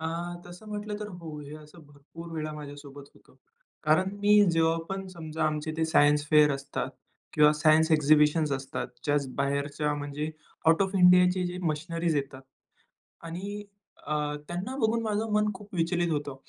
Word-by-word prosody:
आ 160 - -2 0.4
तसं 175 +5 -12
म्हटलं 210 0 -4
तर 210 - -5
हो 155 -3 -8
हे 145 0 -9
असं 155 +2 -15
भरपूर 145 +4 -12
वेळा 155 0 -3
माझ्यासोबत 145 -1 -10
होतं. - - -23 0.5
कारण 155 +5 +3
मी 205 0 +6
जेव्हा 165 0 +2
पण 195 0 -4
समजा 160 -3 -4
आमचे 155 0 -1
ते 160 - +1
सायन्स 145 -1 +3
फेअर 150 -1 +6
असतात 140 +1 -4 0.4
किंवा 150 0 +5
सायन्स 155 +1 +4
एक्झिबिशन्स 150 0 +4
असतात 135 0 -3 0.2
जस्ट 145 -2 +1
बाहेरच्या 140 +2 -1
म्हणजे 145 +1 -4 0.4
आउट 165 +4 +5
ऑफ 195 0 -2
इंडियाचे 180 0 +5
जे 175 +1 -5
मशिनरीज 165 0 -1
येतात 135 -1 -4 0.8
आणि 200 +5 -6 0.4
अ 150 - -1 0.3
त्यांना 185 +10 -4
बघून 230 -1 +1
माझं 220 0 -1
मन 210 0 +2
खूप 200 +1 -12
विचलित 170 0 0
होतो, 145 -2 -3
160 Hz, 155 wpm, -28 LUFS, 150-180 Hz, 0.8 s, मी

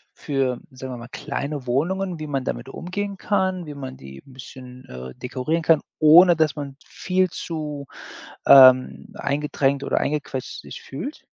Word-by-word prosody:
für, 135 -4 -1
sagen 130 0 -8
wir - - -6
mal, 120 0 -9
kleine 140 -2 -4
Wohnungen, 175 +7 -1
wie 155 - -5
man 135 -2 -2
damit - - -4
umgehen 195 +5 -5
kann. 190 -4 -1
Wie 150 - -7
man 130 -2 -7
die 65 0 -12
'n 135 - -16
bisschen, 125 0 -12
äh, 65 0 -9
dekorieren 130 +6 -2
kann, 160 -2 +4 0.2
ohne 170 +3 +8
dass 155 -1 +1
man 140 -2 -6
viel 185 -1 0
zu, 150 -4 -5 0.6
ähm, 130 -1 +7
eingedrängt 140 -1 -1
oder - - +1
eingequetscht 140 -3 -3
sich - - -10
fühlt? 265 - -7
145 Hz, 160 wpm, -23 LUFS, 130-165 Hz, 0.6 s, ohne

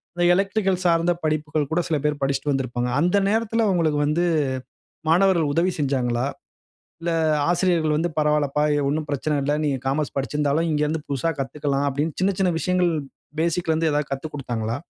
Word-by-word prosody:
அந்த 175 - 0
எலக்ட்ரிக்கல் 195 0 +1
சார்ந்த 170 0 +3
படிப்புகள் 155 -1 -1
கூட 165 - +1
சில 160 - +1
பேர் 150 -1 0
படிச்சுட்டு 135 +1 0
வந்திருப்பாங்க. 125 -2 -1
அந்த 175 +5 +2
நேரத்துல 225 +1 +1
உங்களுக்கு 155 -4 +1
வந்து 155 +4 +1 0.9
மாணவர்கள் 170 -2 +3
உதவி 175 +4 +2
செஞ்சாங்களா? 130 -4 0 0.7
இல்ல 170 +1 -2 0.4
ஆசிரியர்கள் 175 -3 +2
வந்து, 165 +3 0
"பரவால்லப்பா 150 -1 +1
எ - - +1
ஒண்ணும் 155 +2 -1
பிரச்சன 145 +1 -1
இல்ல. 145 +2 0
நீங்க 140 -3 0
காமர்ஸ் 140 +2 -1
படிச்சுருந்தாலும் 150 +3 0
இங்க 150 -1 +1
இருந்து 155 +1 -2
புதுசா 140 +4 0
கத்துக்கலாம்" 140 +1 -1
அப்படின்னு 145 +3 -1
சின்ன 195 +2 +2
சின்ன 185 -2 +3
விஷயங்கள் 180 0 +1 0.5
பேசிக்ல 170 0 0
இருந்து 160 0 +1
எதாவது 150 -1 -1
கத்துக் 150 +3 -5
கொடுத்தாங்களா? 120 -5 -3
150 Hz, 160 wpm, -23 LUFS, 140-170 Hz, 0.9 s, சார்ந்த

